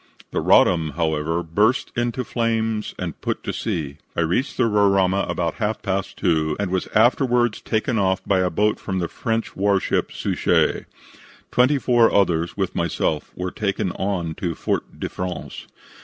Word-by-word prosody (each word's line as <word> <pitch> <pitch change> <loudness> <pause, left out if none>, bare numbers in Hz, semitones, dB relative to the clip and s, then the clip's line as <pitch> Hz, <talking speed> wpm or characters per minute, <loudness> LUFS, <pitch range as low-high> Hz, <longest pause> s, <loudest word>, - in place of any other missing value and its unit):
"The - - -1
Roddam, 80 -4 +4
however, 80 +1 0
burst 105 +10 +1
into 120 +1 -1
flames 115 -3 -1
and 85 -4 -5
put - - -3
to - - -3
sea. 75 -3 -3 0.2
I - - +1
reached 90 - 0
the 130 - +3
Roraima 100 -3 +3
at - - -10
about 85 -2 -1
half 105 +1 -1
past 95 -1 -2
2, 80 -5 +1
and 100 -3 -1
was 95 -1 -1
afterwards 120 0 +3
taken 110 +1 0
off 95 -1 +2
by 95 -2 +2
a 90 -1 +2
boat 105 +5 +1
from 95 - -3
the 85 -2 -1
French 115 +4 -3
warship 100 0 +1
Suchet. - - +1 0.7
Twenty 130 +4 +4
four 120 -3 +4
others 85 -3 +1
with 95 -3 -1
myself 80 -2 -1
were 90 0 -3
taken 100 -2 -1
on 90 -5 -2
to 85 -3 -2
Fort - - -3
de - - -2
France. 90 -1 -6
95 Hz, 165 wpm, -22 LUFS, 85-110 Hz, 0.7 s, Roddam